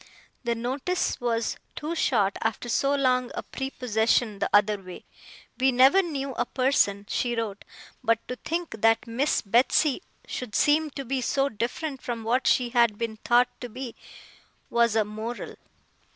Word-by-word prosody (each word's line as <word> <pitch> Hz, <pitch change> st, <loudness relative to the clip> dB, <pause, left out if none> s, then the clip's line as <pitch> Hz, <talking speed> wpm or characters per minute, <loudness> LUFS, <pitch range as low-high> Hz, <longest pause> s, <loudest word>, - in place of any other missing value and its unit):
The 235 Hz, -1 st, 0 dB
notice 265 Hz, +10 st, -2 dB
was 230 Hz, -2 st, -1 dB, 0.2 s
too 310 Hz, +3 st, -4 dB
short 225 Hz, -, +1 dB
after 225 Hz, +2 st, -2 dB
so 275 Hz, +4 st, +2 dB
long 255 Hz, -2 st, +2 dB
a -, -, -4 dB
prepossession 230 Hz, -4 st, 0 dB
the -, -, 0 dB
other 205 Hz, 0 st, +3 dB
way. 185 Hz, -1 st, -10 dB, 0.5 s
We 265 Hz, +1 st, +4 dB
never 265 Hz, +10 st, +6 dB
knew 280 Hz, -6 st, -4 dB
a 240 Hz, -, -1 dB
person, 230 Hz, -7 st, +1 dB
she 240 Hz, -1 st, -1 dB
wrote; 215 Hz, -3 st, -4 dB, 0.4 s
but 230 Hz, -1 st, +3 dB
to 250 Hz, -, -4 dB
think 330 Hz, -9 st, -4 dB
that 225 Hz, +1 st, +4 dB
Miss 250 Hz, +6 st, 0 dB
Betsey 250 Hz, -, +3 dB, 0.2 s
should 250 Hz, -4 st, -6 dB
seem 305 Hz, +1 st, +3 dB
to 275 Hz, -1 st, -7 dB
be 265 Hz, +1 st, -1 dB
so 275 Hz, +3 st, +1 dB
different 260 Hz, +5 st, -4 dB
from 235 Hz, -2 st, -4 dB
what 245 Hz, +4 st, +1 dB
she 245 Hz, -1 st, +3 dB
had 235 Hz, -3 st, +3 dB
been 230 Hz, -1 st, -3 dB
thought 240 Hz, +2 st, +3 dB
to 245 Hz, -, -5 dB
be, 245 Hz, +1 st, -7 dB, 0.8 s
was 235 Hz, -2 st, +3 dB
a 220 Hz, -2 st, +3 dB
Moral! 220 Hz, +3 st, -6 dB
240 Hz, 160 wpm, -26 LUFS, 225-270 Hz, 0.8 s, never